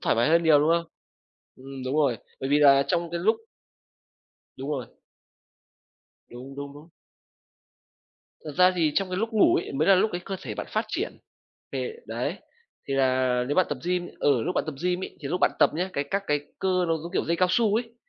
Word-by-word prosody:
thoải - - +1
mái 120 +5 +3
hơn 165 +2 +4
nhiều, 160 -3 +6
đúng 150 - +2
không? 170 0 +2 0.7
Ừm, 135 0 -9
đúng 130 +3 -1
rồi. 140 -6 +2 0.2
Bởi 135 - -3
vì 145 +1 +4
là 140 -1 +6
trong 170 +3 0
cái 170 - -2
lúc 215 +6 +3 1.2
Đúng 135 +3 -5
rồi. 135 -5 -3 1.4
Đúng, 125 +3 -10
đúng, 140 0 -6
đúng. 145 +3 -14 1.6
Thật 155 - -5
ra 185 0 +6
thì 160 -3 +2
trong 195 -1 +1
cái 180 - -2
lúc 225 +4 -2
ngủ 215 - +5
ấy - - -3
mới 150 +5 +1
là 195 - +8
lúc 205 +4 +2
cái 175 - -3
cơ 195 - -4
thể - - -5
bạn - - -5
phát 215 +1 0
triển 350 - -3 0.6
về 455 - -3
đấy, - - -3 0.5
thì 135 - -1
là 130 -2 +2
nếu 145 - 0
bạn 185 - +3
tập 145 - -3
gym 180 0 -1
ừ, 135 -5 +2
lúc 180 +3 -2
bạn - - 0
tập 155 - -4
gym 180 0 0
ấy, - - -10
thì 140 - -5
lúc 180 +4 -2
bạn - - +4
tập - - +5
nhé, 180 +4 -1
cái, 140 - -1
các 195 +7 -2
cái 145 0 +1 0.2
cơ 185 -1 +1
nó 165 - +2
giống 170 +3 -8
kiểu - - 0
dây 170 - 0
cao 185 +1 +3
su 215 +1 +2
ấy, 230 +1 -2
165 Hz, 220 wpm, -26 LUFS, 140-185 Hz, 1.6 s, là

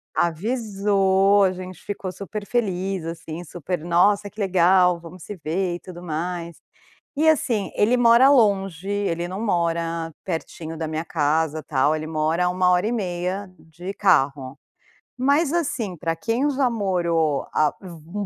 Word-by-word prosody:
Avisou, 200 0 +2
a 190 - +3
gente 185 0 -9
ficou 200 -2 -5
super 200 +3 -7
feliz 195 -6 -1
assim, 165 0 -6
super 175 0 -5
"nossa 200 +4 +3
que 215 - -15
legal, 180 -2 +4
vamos 170 +1 -12
se 205 - -7
ver 175 +2 -2
e - - -7
tudo 175 -2 -10
mais", 170 0 -4 0.6
e 310 +3 +2
assim 245 -10 +2
ele 230 +4 +3
mora 240 +2 +6
longe, 195 - +2
ele 175 -4 -1
não 185 +3 -5
mora 170 -4 -1
pertinho 165 -2 -5
da 160 0 -3
minha 155 +1 -3
casa, 155 -1 0
tal. 145 +2 +1
Ele 155 0 -5
mora 160 +2 0
há - - +2
1h30 185 0 0
de 175 +5 -9
carro, 140 -9 +1 0.6
mas 280 +4 +2
assim, 250 - -1
para 165 0 -3
quem 230 - 0
já 265 -2 +1
morou 170 -9 0
a 155 -1 +2
um 175 +3 -7
180 Hz, 145 wpm, -23 LUFS, 165-205 Hz, 0.6 s, mora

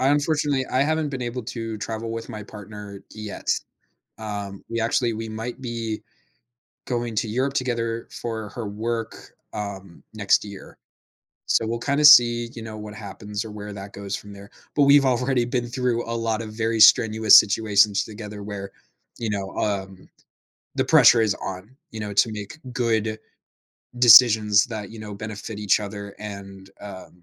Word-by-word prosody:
I 130 - +3
unfortunately, 145 -2 +1
I 130 +2 +1
haven't 155 +1 0
been 135 -2 -4
able 120 0 -4
to 115 -1 -5
travel 115 +1 -5
with 115 +1 -6
my 110 -3 -7
partner 105 -1 -10
yet, 105 -1 -8 0.7
um, 100 -3 -6
we 115 - -2
actually 115 +1 +1
we 110 +1 -5
might 115 +4 -6
be 115 -3 -4 0.9
going 120 -2 -2
to 110 - 0
Europe 130 +5 -1
together 115 -3 -2
for 110 -2 -5
her 115 -1 -6
work, 115 +2 -4 0.4
um, 95 -4 -7
next 105 -1 +2
year. 100 -2 -11 0.7
So 115 - +2
we'll 115 +1 -2
kinda 140 +4 +1
see, 120 -4 +7
you 115 - -7
know, 110 -1 -8
what 105 0 -9
happens 105 0 -6
or 110 - -8
where 105 0 -8
that 100 0 -9
goes 100 -1 -5
from 105 - -10
there. 100 +1 -12 0.3
But 145 - +4
we've 140 0 +6
already 125 0 +1
been 120 0 -2
through 120 -1 -2
a 115 - -2
lot 115 -1 -1
of 110 -1 -8
very 115 0 -1
strenuous 110 -1 +7
situations 105 -1 +2
together 105 -1 -9
where, 100 -1 -7 0.5
you 115 - -2
know, 100 -2 -3
um, 95 -2 -3 0.7
the - - +1
pressure 120 - +6
is 105 -2 +1
on, 95 +7 -8
you 110 - -8
know, 105 -1 -5
to 110 +3 +3
make 105 +9 -8
good 110 -3 0 0.8
decisions 110 -4 +7
that, 110 -4 -6
you 115 - -11
know, 105 -1 -7
benefit 110 0 -7
each 105 0 +2
other 100 -1 -7
and, 100 -2 -9
um, 95 -3 -11
110 Hz, 170 wpm, -23 LUFS, 105-120 Hz, 0.9 s, see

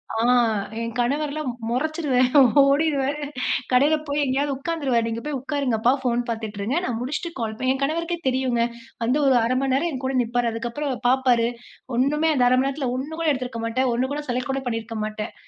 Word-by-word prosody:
ஆ - - -1 0.6
என் 230 0 -4
கணவரெலாம் 290 +3 -1 0.2
முறைச்சிருவேன். 260 -1 +1 0.3
ஓடிடுருவாரு. 285 0 +1 0.5
கடையில 280 +5 +4
போய் 285 +1 -1
எங்கேயாவது 275 +1 0
உட்கார்ந்துருவாரு. 275 -6 0
நீங்க 230 0 -3
போய் 300 -2 -2
உட்காருங்கப்பா, 255 -5 +1
ஃபோன் 245 -1 +1
பார்த்துட்டுருங்க. 220 +2 -3
நான் 235 -2 -2
முடிச்சுட்டு 300 +7 -3
கால் 220 -2 -2
பண் 255 - 0
என் 270 - -2
கணவருக்கே 335 +4 -1
தெரியுங்க. 255 -2 +1 0.4
வந்து 250 +5 +2
ஒரு 265 -2 +5
0:30 235 +3 +1
மணி 270 -1 +1
நேரம் 340 +6 +1
என் 265 -3 -5
கூட 265 - -1
நிப்பாரு. 240 0 0
அதுக்கப்புறம், 240 +5 -3
பார்ப்பாரு. 250 -2 +3 0.5
ஒன்னுமே 300 +5 +2
அந்த 250 - +3
0:30 - - +3
மணி 265 - +2
நேரத்தில 275 -2 -2
1 275 +5 -4
கூட 330 - 0
எடுத்திருக்க 255 -4 -3
மாட்டேன், 255 +3 0
1 255 +3 -1
கூட 295 - -3
செலக்ட் 250 +2 -1
கூட 270 0 -2
பண்ணியிருக்க 225 -1 -3
மாட்டேன். 215 0 -5
260 Hz, 180 wpm, -23 LUFS, 240-285 Hz, 0.6 s, ஒரு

